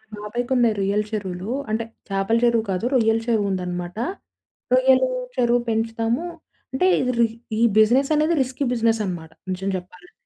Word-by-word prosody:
మా - - -10
బాబాయికున్నాయి 240 +1 +1
రొయ్యల 200 +2 +1
చెరువులు. 195 -1 -4 0.2
అంటే 220 +1 0 0.3
చేపల 195 +4 +1
చెరువు 235 -2 +3
కాదు. 185 +4 -2
రొయ్యల 225 -3 +3
చెరువు 220 -3 +2
ఉందనమాట. 180 0 -4 0.8
రొయ్యలు 260 0 +5 0.3
చెరువు 245 -1 +3
పెంచుతాము. 225 +5 -1 0.5
అంటే 365 +8 +2
ఇది 255 -1 +1
రి 235 - +5 0.3
ఈ - - +1 0.2
బిజినెస్ 250 +7 +4
అన్నది 310 +3 +2
రిస్కీ 260 +2 -2
బిజినెస్ 225 -2 +1
అనమాట, 165 -3 -6 0.2
నిజం 190 +1 -3
చెప్పాలంటే. 180 0 -13
225 Hz, 145 wpm, -22 LUFS, 195-245 Hz, 0.8 s, రొయ్యలు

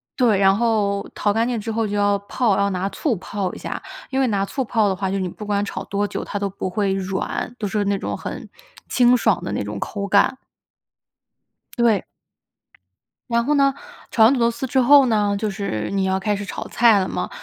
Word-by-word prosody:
对， 230 -6 +3
然 195 0 +4
后 210 -3 0
淘 205 -1 0
干 225 +2 +1
净 245 -3 -1
之 225 - -6
后 225 0 0
就 205 - -3
要 205 0 +2
泡， 205 +1 0
要 200 0 +2
拿 185 0 -2
醋 255 -1 -1
泡 190 +1 -4
一 - - -8
下， - - -5 0.3
因 265 0 -1
为 260 - +2
拿 200 -3 0
醋 265 +5 -3
泡 220 -3 +1
的 190 - 0
话， 190 0 -2
就 195 - -2
是 - - -2
你 185 - -1
不 210 +4 -8
管 205 0 0
炒 190 -1 -5
多 205 +1 -1
久 - - -4
它 205 - -4
都 200 0 -1
不 190 -1 -4
会 195 0 0
软， 195 +4 -3
都 210 - -2
是 210 0 -1
那 200 0 +1
种， - - -4
很 - - -7 0.4
清 245 0 +4
爽 220 -4 +1
的 - - -4
那 105 - -2
种 105 0 -5
口 200 -1 -4
感。 200 +6 +3 1.4
对。 230 -5 +3 1.3
然 235 0 +1
后 295 - +2
呢， 275 -1 +3 0.4
炒 225 - +4
完 245 - +6
土 260 - -1
豆 235 0 +3
丝 235 +3 -5
之 260 +1 +2
后 280 +2 +7
呢， 210 -3 +1
就 215 0 -1
是 195 - -3
你 195 -1 0
要 190 0 0
开 210 +1 0
始 205 - -5
炒 - - -6
菜 225 -4 +4
了 185 - -1
嘛。 - - -3
205 Hz, 245 characters per minute, -21 LUFS, 195-235 Hz, 1.4 s, 后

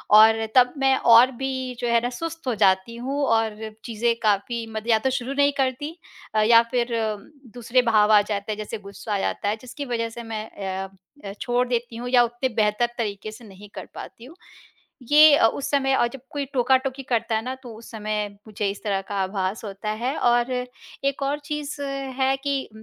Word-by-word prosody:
और 220 +1 +7
तब 250 -1 +5
मैं 270 -1 +3
और 240 +2 +6
भी 260 -1 -3
जो 240 - -2
है 235 0 +4
ना 245 - 0
सुस्त 330 -2 -6
हो 245 - +1
जाती 190 +3 +2
हूँ 270 +4 -3
और 225 -2 +1 0.3
चीज़ें 230 +1 0
काफ़ी 215 +3 0
मद 220 +1 -5
या 220 -1 +5
तो 265 - 0
शुरू 260 +1 -3
नहीं 285 0 +4
करती 275 +5 -2 0.4
अ, 215 - +4
या 230 +2 +7
फिर 245 -1 0 0.7
दूसरे 245 +1 +2
भाव 215 -1 +4
आ 210 - +7
जाते 205 0 -3
हैं, 210 - -3
जैसे 215 +1 -5
ग़ुस्सा 200 +1 -7
आ - - 0
जाता 205 +1 -1
है 210 - 0
जिसकी 255 +3 -7
वजह 230 -3 -2
से 235 +1 -8
मैं 220 -1 -5 0.4
अ - - -11 0.4
अ, 195 - -5
छोड़ 245 0 +1
देती 240 -1 -2
हूँ 240 +2 -5
या 245 -1 +5
उतने 240 +2 -2
बेहतर 210 +2 +2
तरीके 215 -2 -4
से 225 +2 -13
नहीं 205 0 -13
कर - - -7
पाती 230 - -10
हूँ। 300 +6 -13 0.8
ये 300 0 +8
अ, - - +5
उस 270 +5 -2
समय 270 -1 +2
अ, 240 - +3
जब 255 +2 -8
कोई 285 -1 -3
टोका-टोकी 260 +1 +1
करता 235 -3 -1
है 220 - -1
ना, 255 +1 -3
तो 250 -4 -11
उस 225 - -13
समय 215 -1 -3 0.2
मुझे 210 -1 -2
इस 200 - -8
तरह 200 -2 0
का - - -3
आभास 190 +2 -3
होता 205 +1 -5
है 260 +5 -1
और 240 +1 +2 0.5
एक 275 0 -1
और 280 +2 0
चीज़ 295 -1 -5
है 270 -1 -1
कि, 275 -1 -2
235 Hz, 210 wpm, -24 LUFS, 215-265 Hz, 0.8 s, ये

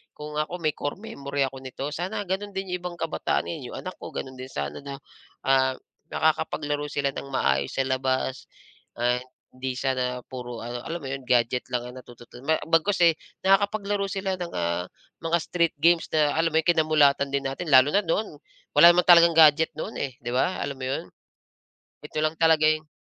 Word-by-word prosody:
kung 150 0 -7
ako 155 +3 -2
may 155 - +2
core 145 0 -4
memory 140 -9 -3
ako 135 0 -3
nito, 130 +1 -6
sana 185 +7 -3
gano'n 195 +2 -4
din 190 -1 -4
'yong 180 - -2
ibang 175 0 -6
kabataan 165 -1 -1
ninyo, 145 -7 -6
anak 185 - -7
ko, - - -9
gano'n 130 -1 -6
din 130 - -6
sana 70 - -4
na, 140 0 -7 0.5
ah, 130 -1 +3 0.3
nakakapaglaro 150 -1 0
sila 140 -1 -1
ng 140 - -7
maayos 70 - 0
sa 135 - +2
labas, 130 0 -1 0.5
and 125 +1 +1 0.3
hindi 130 0 -4
sana 125 -2 -1
puro 125 -2 -7
ano, 120 +1 -5
alam 170 +1 -4
mo - - -5
'yon, 135 0 -5
gadget 120 0 +2
lang 120 - 0
ang 125 - -10
natututunan 120 +1 -14
me 160 - +4
bagkus, 165 +4 +2
eh, 170 -1 +6 0.3
nakakapaglaro 200 +1 +2
sila 190 -1 -2
ng, 175 -1 -5
ah, 85 +1 -1 0.4
mga 165 +1 +1
street 170 -2 0
games 170 +1 +4
na 150 -2 +3
alam 165 0 +2
mo - - +3
'yon, - - -25
kinamulatan 155 -4 +3
din 140 0 0
natin. 135 +6 -4
Lalo 130 0 +7
na 200 - +3
noon, 165 -1 -1 0.4
wala 170 +4 +9
naman 180 +1 +2
talagang 170 -1 +7
gadget 160 0 +6
noon, 155 - -5
eh, 135 -3 -3
'di 120 - -3
ba, 130 +9 +1
alam 140 - -4
mo 130 - -4
'yon? 135 - -2 1.0
Nito 150 +1 -5
lang 155 +1 0
talaga 160 -1 +4
'yung 155 0 +1
150 Hz, 195 wpm, -25 LUFS, 130-170 Hz, 1.0 s, wala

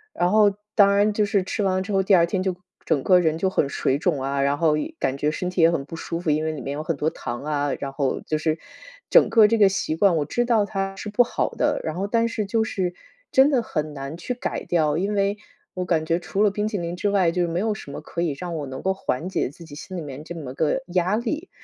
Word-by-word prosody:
然 175 +1 +1
后 210 -1 +5 0.2
当 200 -1 +6
然 205 +1 +3
就 210 0 +2
是 200 -1 +1
吃 205 +3 -2
完 185 -1 +1
之 205 - -6
后， 195 -1 +3
第 195 +1 +5
2 170 -2 +5
天 185 +2 -2
就 185 -1 -1 0.3
整 150 -5 +1
个 180 -1 +5
人 160 -2 +1
就 190 +3 +1
很 150 -6 0
水 135 - 0
肿 155 -3 0
啊， 140 +1 -1
然 140 +1 +1
后 155 -1 +3
也 325 - -4
感 135 +1 -1
觉 150 +2 +1
身 180 +3 -3
体 180 -1 -1
也 165 - +7
很 145 -5 -2
不 165 - -8
舒 165 +1 -4
服， 170 - -2
因 155 +1 +1
为 160 - -1
里 150 -3 -6
面 140 +3 -4
有 150 +2 -4
很 165 +1 -1
多 150 +3 +1
糖 120 -5 -6
啊， 145 -2 -1
然 140 - -4
后 140 -1 -1
就 155 - -2
是 155 0 0 0.5
整 - - +6
个 225 -2 +6
这 230 +2 +2
个 205 -3 +6
习 190 -4 -1
惯 185 +1 +4
我 150 - 0
知 240 +9 0
道 225 -4 +3
它 195 -1 -3
是 210 - -6
不 215 +4 +4
好 - - -1
的， - - 0
然 155 - -3
后 195 +3 -2
但 230 +2 +2
是 220 -2 -2
就 220 +3 +1
是 185 -5 -2 0.4
真 265 +2 +6
的 265 -5 +2
很 155 -8 -3
难 140 +2 -6
去 250 - -4
改 245 - -4
掉。 155 -3 +1
因 195 +4 -1
为 200 0 +1 0.4
我 180 0 -2
感 165 -2 +1
觉 165 +1 +1
除 195 +3 -2
了 210 - +5
冰 210 +1 -2
淇 215 -1 -2
淋 170 -1 -3
之 205 +3 -1
外， 190 -4 +3
就 175 0 0
没 170 +1 -1
有 215 +2 0
什 140 - -9
么 145 - -6
可 170 +2 -5
以 160 -5 0
让 175 -2 -4
我 150 -2 -3
能 130 -1 -7
够 190 - +1
缓 180 -3 -3
解 190 - -1
自 155 +5 -14
己 145 -3 -11
心 185 +5 -8
里 - - -3
面 145 -1 -8
这 170 - -7
么 145 -7 -7
个 155 - 0
压 180 +2 +1
力， 300 +9 -3
175 Hz, 300 characters per minute, -23 LUFS, 155-200 Hz, 0.5 s, 也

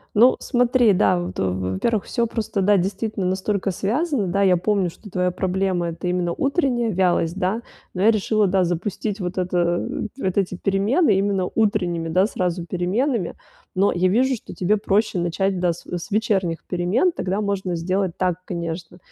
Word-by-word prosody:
Ну, 240 +5 +6
смотри, 245 -2 +3
да, 185 -1 +3
вот 175 - -5
в 95 0 -1
во-первых, 220 -4 +1
всё 235 -1 -1
просто, 220 -3 -2
да, 205 +2 +4
действительно 195 +2 -2
настолько 190 +2 -1
связано. 235 - -1
Да, 195 +3 0
я 185 -2 +4
помню, 195 0 +1
что 205 +5 -13
твоя 180 -1 0
проблема 185 -1 -1
это 165 +2 -5
именно 180 -1 0
утренняя 270 - 0
вялость, 175 -2 +1
да, 195 +5 0 0.3
но 185 - -3
я 220 - +7
решила, 215 0 +1
да, 185 0 +2
запустить 195 +4 -3
вот 180 +1 -4
это 175 -1 0 0.3
вот 190 -8 -2
эти 185 -2 +1
перемены 200 - +2
именно 195 -1 +1
утренними, 180 -7 0
да, 185 +4 +3
сразу 180 -4 -2
переменами, 190 +5 -1 0.4
но 195 +2 +2
я 180 +1 +2
вижу, 255 +6 +2
что 225 - -10
тебе 190 +3 +1
проще 210 0 +1
начать 180 +2 0
да 175 -1 +3
с 170 - -9
с 175 +2 -5
вечерних 195 -6 0
перемен, 185 - +1
тогда 195 - -2
можно 195 -3 -2
сделать 185 +1 -1
так, 180 -2 +1
конечно. 170 0 -5
190 Hz, 175 wpm, -22 LUFS, 180-215 Hz, 0.4 s, я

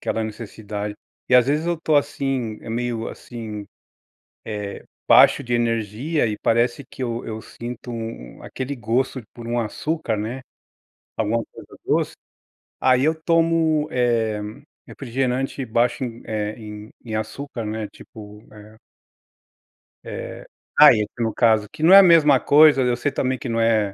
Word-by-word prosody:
aquela 110 - -2
necessidade. 105 -1 -6 0.3
E 125 - +3
às 125 -1 +6
vezes 150 +4 0
eu 170 -2 -1
tô 155 -2 +2
assim, 135 -6 -1
eh, - - -11
meio 115 -1 -2
assim, 110 -4 -8 0.8
eh, 105 -2 -5 0.2
baixo - - +6
de 120 -1 -3
energia, 120 +5 0
e 105 -1 -3
parece 120 +4 +1
que - - -10
eu 120 -1 -3
eu 110 -1 -6
sinto 120 +2 -8
u - - -5
um 110 - -8
aquele 135 +2 -5
gosto 125 +3 -1
por 120 -1 -9
um 120 +1 0
açúcar, 120 +2 -2
né, 115 +5 -4 0.7
alguma 115 +1 0
coisa - - -14
doce, - - 0 0.7
aí 130 0 +3
eu 160 +2 +3
tomo, 160 -1 +1
eh, 115 -5 0 0.5
refrigerante 135 +1 -2
baixo 120 +2 0
em, 120 -1 -7
eh, 105 -1 -3
em 105 -1 -9
em 110 -2 -6
açúcar, 115 +3 -5
né, 110 0 -4
tipo, 105 0 -13
eh 105 +1 -14 1.3
Eh, - - -7 0.3
diet, 105 -1 +7
no 115 -1 0
caso, 110 -3 +3
que 155 - -8
não 175 +4 +7
é 195 - +12
a - - +8
mesma 155 -6 +6
coisa, 150 -1 +6
e 125 - +2
eu 120 - +2
sei 130 +4 -1
também 130 0 -1
que 125 - -6
não 115 - -1
é 110 -3 +2
120 Hz, 160 wpm, -22 LUFS, 110-135 Hz, 1.3 s, é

